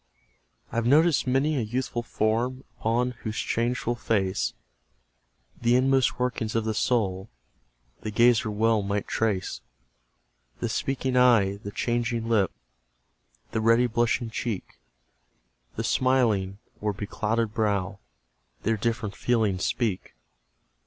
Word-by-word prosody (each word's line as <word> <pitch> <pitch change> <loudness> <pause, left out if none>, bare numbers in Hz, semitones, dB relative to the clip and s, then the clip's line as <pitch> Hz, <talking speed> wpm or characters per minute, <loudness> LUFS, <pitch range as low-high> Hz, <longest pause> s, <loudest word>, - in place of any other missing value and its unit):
I've 115 0 0
noticed 155 +2 +4
many 140 +4 +2
a - - +1
youthful 120 +2 -2
form, 120 +3 -1 0.2
Upon 120 +3 +1
whose 110 0 -4
changeful 120 +1 0
face 100 -5 -1 1.1
The 120 +1 +3
inmost 130 0 +3
workings 120 -3 -2
of 115 -1 +1
the 110 - 0
soul 100 -5 0 0.7
The 110 - -4
gazer 115 0 +4
well 110 +1 +2
might 100 +1 -2
trace; 105 -5 -1 1.0
The - - -2
speaking 130 -1 -1
eye, 115 -6 +4
the 100 0 -8
changing 120 +1 -1
lip, 105 -5 +2 1.0
The 110 - -1
ready 115 +2 +4
blushing 120 0 0
cheek, 110 -3 -4 1.0
The - - -2
smiling, 115 -7 +2 0.2
or 105 0 0
beclouded 110 +2 -2
brow, 100 -3 -1 0.6
Their 110 +1 +1
different 115 -1 -2
feelings 110 -6 +1
speak. 110 - -2
115 Hz, 115 wpm, -26 LUFS, 105-125 Hz, 1.1 s, noticed